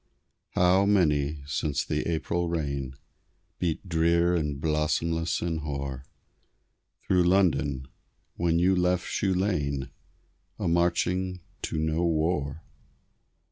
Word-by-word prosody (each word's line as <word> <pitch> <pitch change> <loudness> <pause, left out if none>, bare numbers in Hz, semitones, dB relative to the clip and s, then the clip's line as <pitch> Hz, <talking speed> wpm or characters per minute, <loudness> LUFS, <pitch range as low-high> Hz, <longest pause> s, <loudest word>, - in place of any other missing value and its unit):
How 90 +2 +4
many, 75 -7 +2
since 70 -1 -1
the 75 - -1
April 85 +1 -1
rain 70 -5 -3 0.6
Beat 90 +2 -2
drear 85 +1 +3
and 75 -4 -1
blossomless 80 +2 0
and 85 -2 -1
hoar 70 -3 -5 1.0
Through 90 -2 +3
London, 80 -8 +2 0.5
when 85 -1 +1
you 90 +2 +3
left 90 0 +1
Shoe 95 -2 0
Lane, 75 -8 -1 0.7
A - - -2
marching 90 +2 +1 0.2
to 80 - -3
no 80 +2 0
war! 80 -2 0
80 Hz, 105 wpm, -27 LUFS, 75-90 Hz, 1.0 s, How